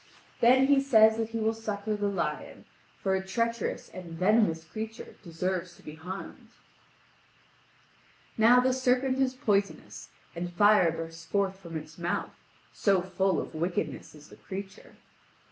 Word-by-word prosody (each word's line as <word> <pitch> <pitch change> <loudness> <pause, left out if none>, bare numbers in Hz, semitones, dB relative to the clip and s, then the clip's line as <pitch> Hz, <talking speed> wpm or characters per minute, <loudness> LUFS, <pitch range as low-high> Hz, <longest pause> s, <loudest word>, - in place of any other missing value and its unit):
Then 255 +3 +6
he 275 0 +4
says 220 -5 +5
that 225 -1 -2
he 230 - -4
will 220 0 +1
succour 215 -1 -3
the 205 0 -1
lion, 200 -1 -3 0.3
for 190 - -1
a 190 0 0
treacherous 230 +3 -2
and 180 -3 -9
venomous 185 -2 +2
creature 220 +6 -7
deserves 180 0 -3
to - - -20
be 150 - -8
harmed. 180 +5 -8 1.9
Now 230 +3 +6
the 255 +1 +2
serpent 260 +1 +1
is 260 -1 +1
poisonous, 205 -5 -1 0.3
and 175 +1 -4
fire 205 -2 +5
bursts 165 0 -7
forth 195 +1 -1
from 170 -4 -7
its 155 +2 -10
mouth 170 +1 -2 0.4
so 195 -3 +2
full 190 +1 0
of - - -6
wickedness 160 -3 -3
is 150 0 -15
the - - -14
creature. 195 +1 -9
195 Hz, 145 wpm, -28 LUFS, 175-225 Hz, 1.9 s, Then